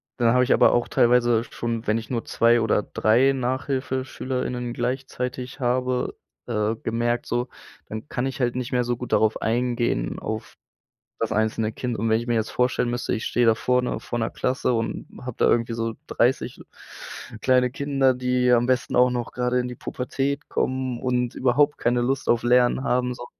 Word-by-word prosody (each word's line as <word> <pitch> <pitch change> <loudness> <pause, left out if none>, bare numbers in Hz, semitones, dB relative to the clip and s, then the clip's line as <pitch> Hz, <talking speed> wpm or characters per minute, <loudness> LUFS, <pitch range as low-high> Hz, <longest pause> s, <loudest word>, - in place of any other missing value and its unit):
da 115 -2 +3
habe 125 0 +4
ich - - +3
aber - - +5
auch 120 - +1
teilweise 120 -1 +3
schon, 115 -1 -4
wenn 110 - +2
ich 115 0 -7
nur 120 -3 -2
2 115 0 +3
oder 110 -1 +2
3 125 +8 +3
Nachhilfeschüler:innen 130 -1 -2
gleichzeitig 125 +1 -4
habe, 125 0 0 0.3
äh, 110 -2 0
gemerkt 120 +1 -1
so, 120 +1 -2 0.4
dann 110 +5 -7
kann 125 -3 -2
ich 135 +1 -4
halt 120 -2 0
nicht 125 -1 -3
mehr 125 -1 +1
so 120 0 0
gut 125 0 -7
darauf 110 0 +2
eingehen, 120 - 0
auf 110 0 -5 0.6
das 115 - -1
einzelne 110 0 0
Kind 120 0 -4
und 115 +2 0
wenn 110 0 +3
ich 120 - -7
mir 120 - +2
jetzt 110 0 -1
vorstellen 125 -1 +1
müsste, 120 0 -2
ich 110 - -2
stehe 120 - +2
da 115 - +5
vorne 125 +1 0
vor 120 - -4
'ner 115 - -1
Klasse 130 0 -1
und 115 -1 -2
habe 125 -2 -7
da - - +3
irgendwie 115 0 +1
so 115 -1 -2
30 - - 0 0.8
kleine 125 -1 +3
Kinder, 135 -1 +1
die 125 0 +1
am 120 0 +4
besten 130 0 0
auch 125 0 +5
noch 120 -1 -3
gerade 125 0 0
in 125 - -3
die 125 - -6
Pubertät 135 +4 -3
kommen 130 -1 -1
und 125 -1 -1
überhaupt 145 +3 +2
keine 120 +1 +1
Lust 130 +2 -1
auf 120 -1 +3
Lernen 125 +2 +3
haben 125 -1 +1
so 120 0 -9
125 Hz, 185 wpm, -24 LUFS, 115-125 Hz, 0.8 s, aber